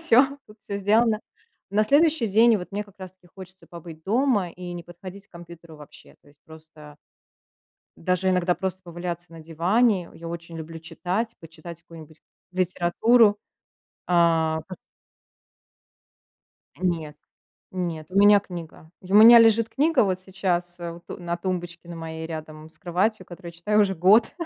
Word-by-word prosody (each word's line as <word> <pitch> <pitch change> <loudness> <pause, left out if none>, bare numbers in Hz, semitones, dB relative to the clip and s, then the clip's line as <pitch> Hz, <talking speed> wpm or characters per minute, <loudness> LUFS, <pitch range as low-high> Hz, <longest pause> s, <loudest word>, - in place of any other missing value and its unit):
всё 280 -2 +3
тут 210 +1 -17
всё 200 - -6
сделано. 215 +2 +2 0.5
На 205 +2 +2
следующий 295 +1 +3
день 225 +3 +5
вот 180 0 -8
мне 205 +1 -3
как 200 -1 -22
раз 185 -1 -9
таки 185 -1 -25
хочется 185 -1 -13
побыть 165 -2 -11
дома 220 -4 +1
и 175 0 -9
не 175 0 -7
подходить 185 +3 -12
к - - -58
компьютеру 170 -2 -13
вообще, 150 -1 -15
то - - -23
есть 145 0 -25
просто 155 -2 -15 1.0
даже 185 +2 0
иногда 180 -1 +1
просто 190 0 -4
поваляться 175 0 -7
на 165 - -11
диване, 180 +5 +1
я 165 - -10
очень 165 0 -8
люблю 165 0 -8
читать, 180 +7 -4
почитать 165 +1 -12
какую-нибудь 160 -2 -15 0.3
литературу, 195 +5 +3 0.7
а, 165 -2 +2
пос 185 - -7 2.0
Нет, 165 -4 -2 0.5
нет, 170 -4 -4
у 185 - -6
меня 205 0 +7
книга, 170 -4 -10
и 185 +1 -8
у - - +6
меня 230 +2 +10
лежит 225 0 +4
книга 290 +2 +2
вот 185 -2 -1
сейчас, 180 -2 -3
э, 170 -1 -5
вот, 170 +1 -14
э, - - -5
на 170 0 -3
тумбочке 175 -1 -5
на 170 - -8
моей 160 0 -6
рядом 155 -1 -8
с - - -15
кроватью, 185 +2 -1
которую 175 0 -10
я 170 - -18
читаю 210 +5 +2
уже 195 -2 +2
год. 190 +7 +4
180 Hz, 160 wpm, -24 LUFS, 165-205 Hz, 2.0 s, меня